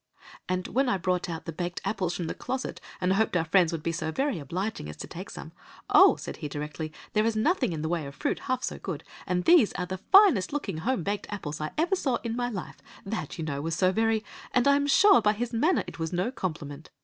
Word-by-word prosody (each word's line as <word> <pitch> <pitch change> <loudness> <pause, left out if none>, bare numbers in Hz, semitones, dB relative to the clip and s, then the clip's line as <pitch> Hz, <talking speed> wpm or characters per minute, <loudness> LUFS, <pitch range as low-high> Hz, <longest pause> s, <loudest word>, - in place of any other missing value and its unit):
"And 185 0 -1
when 265 +1 +1
I 195 - +2
brought 180 0 -1
out 165 -1 -5
the 165 - -4
baked 175 +2 -4
apples 185 -5 -1
from 175 - -3
the - - -3
closet, 260 -1 -4 0.2
and 185 0 +2
hoped 200 -2 +2
our 165 - 0
friends 175 0 +4
would 165 -2 -4
be 165 - 0
so 160 -1 -3
very 270 - -1
obliging 170 - -4
as 75 - -9
to - - -6
take - - -8
some, - - -8 0.4
'Oh,' - - +8
said - - -7
he - - -5
directly, 150 +2 -5 0.2
'there 215 - +3
is 230 - 0
nothing 255 - +2
in 155 -2 -4
the - - -1
way 165 -3 -1
of 140 - -10
fruit - - -1
half 255 0 -2
so - - -3
good, - - -5 0.2
and 180 -1 0
these 330 - +6
are 180 - -2
the 185 +1 -5
finest 380 - +5
looking 210 - -3
home 235 0 -1
baked 200 +3 -2
apples 155 -8 -5
I 155 - -2
ever 340 +5 +2
saw 270 -9 0
in 230 -1 -2
my 245 0 -1
life.' 195 -7 -7 0.2
That, 195 -8 -4
you 160 - -3
know, 140 -2 -3
was 165 +1 -2
so 185 +1 +3
very— 225 +2 +1 0.3
And 250 +1 +4
I 280 - +6
am 285 0 +1
sure 385 +7 +6
by 210 - +3
his 235 +2 -4
manner 305 +11 +2
it - - -10
was 160 -1 -2
no 180 +7 0
compliment. 155 - -5
185 Hz, 250 wpm, -28 LUFS, 165-245 Hz, 0.4 s, Oh